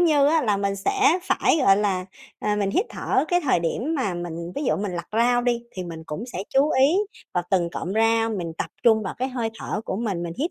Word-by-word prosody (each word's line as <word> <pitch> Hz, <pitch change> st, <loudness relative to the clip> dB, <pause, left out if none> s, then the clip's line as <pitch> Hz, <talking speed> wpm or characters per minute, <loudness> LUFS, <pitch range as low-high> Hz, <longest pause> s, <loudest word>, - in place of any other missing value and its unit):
như 300 Hz, -5 st, +4 dB
á, 320 Hz, +1 st, +3 dB
là 210 Hz, -4 st, +2 dB
mình 200 Hz, 0 st, -1 dB
sẽ 370 Hz, -, +2 dB
phải, 325 Hz, -, +2 dB
gọi 195 Hz, -9 st, +5 dB
là, 195 Hz, -3 st, 0 dB, 0.3 s
ờ, 210 Hz, 0 st, 0 dB
mình 200 Hz, -1 st, 0 dB
hít 390 Hz, -, +1 dB
thở 265 Hz, -, 0 dB
cái 355 Hz, 0 st, +3 dB
thời 255 Hz, -, +2 dB
điểm 240 Hz, -, -1 dB
mà 205 Hz, -10 st, -1 dB
mình 170 Hz, 0 st, -5 dB
ví 290 Hz, -, -3 dB
dụ -, -, +2 dB
mình 200 Hz, -2 st, -3 dB
lặt 170 Hz, 0 st, -5 dB
rau 245 Hz, +2 st, +3 dB
đi, 240 Hz, -1 st, 0 dB
thì 185 Hz, -1 st, -6 dB
mình 165 Hz, -2 st, -8 dB
cũng 155 Hz, +8 st, -5 dB
sẽ 195 Hz, -6 st, -5 dB
chú 280 Hz, +3 st, +3 dB
ý 275 Hz, +7 st, +4 dB, 0.4 s
vào 175 Hz, -, 0 dB
từng 175 Hz, -3 st, +2 dB
cọng 180 Hz, +2 st, -4 dB
rau, 225 Hz, 0 st, +3 dB
mình 175 Hz, -6 st, -3 dB
tập -, -, -3 dB
trung 220 Hz, -2 st, +4 dB
vào 190 Hz, -, -4 dB
cái 260 Hz, +1 st, -1 dB
hơi 240 Hz, -3 st, -2 dB
thở -, -, -3 dB
của 190 Hz, -, -3 dB
mình. 205 Hz, -6 st, -2 dB
Mình 170 Hz, -1 st, -4 dB
hít 320 Hz, +6 st, 0 dB
220 Hz, 250 wpm, -24 LUFS, 185-260 Hz, 0.4 s, gọi